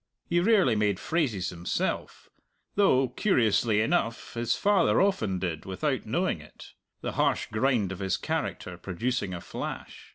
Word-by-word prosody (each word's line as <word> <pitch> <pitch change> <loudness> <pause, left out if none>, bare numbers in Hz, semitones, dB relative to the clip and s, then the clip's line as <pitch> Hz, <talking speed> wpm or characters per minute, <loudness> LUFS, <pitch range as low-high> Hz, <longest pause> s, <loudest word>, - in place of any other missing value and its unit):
He 175 - +1
rarely 190 - +4
made 105 -2 +1
phrases 120 - 0
himself 85 0 -3 0.5
though, 135 -11 +3
curiously 115 - +2
enough, 115 +1 -1
his 120 0 0
father 205 -1 +3
often 150 - +1
did 85 -4 -3
without 95 -1 -2
knowing - - 0
it - - -14 0.3
the - - -3
harsh - - +1
grind 110 -3 +1
of 95 - -6
his 95 -2 0
character 90 -1 -3
producing 100 +3 -2
a 85 -1 -5
flash. - - -7
110 Hz, 140 wpm, -28 LUFS, 95-135 Hz, 0.5 s, rarely